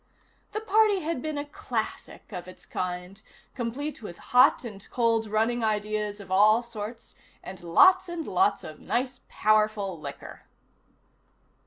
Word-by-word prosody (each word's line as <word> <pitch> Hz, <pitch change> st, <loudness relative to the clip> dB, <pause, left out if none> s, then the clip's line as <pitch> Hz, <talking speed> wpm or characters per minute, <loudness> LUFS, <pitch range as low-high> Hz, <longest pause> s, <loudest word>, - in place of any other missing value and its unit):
The 430 Hz, -, -2 dB
party 430 Hz, -2 st, +3 dB
had 315 Hz, -4 st, -2 dB
been 310 Hz, -1 st, -3 dB
a 285 Hz, -, -3 dB
classic 290 Hz, -, -5 dB
of 180 Hz, -2 st, -6 dB
its 185 Hz, -, -13 dB
kind, 180 Hz, +2 st, -5 dB, 0.3 s
complete 265 Hz, +4 st, -4 dB
with 175 Hz, -5 st, -8 dB, 0.2 s
hot 250 Hz, 0 st, +6 dB
and 205 Hz, -4 st, -9 dB
cold 230 Hz, -2 st, +1 dB
running 225 Hz, +3 st, 0 dB
ideas 210 Hz, -1 st, -1 dB
of 195 Hz, -2 st, -11 dB
all 215 Hz, +5 st, +5 dB
sorts, 225 Hz, 0 st, -8 dB, 0.3 s
and 185 Hz, -1 st, -9 dB
lots 355 Hz, -, +5 dB
and 340 Hz, -2 st, -4 dB
lots 385 Hz, +2 st, +2 dB
of -, -, -9 dB
nice 250 Hz, +1 st, -2 dB
powerful 215 Hz, -4 st, +1 dB
liquor. 140 Hz, -2 st, -9 dB
220 Hz, 140 wpm, -27 LUFS, 205-270 Hz, 0.3 s, hot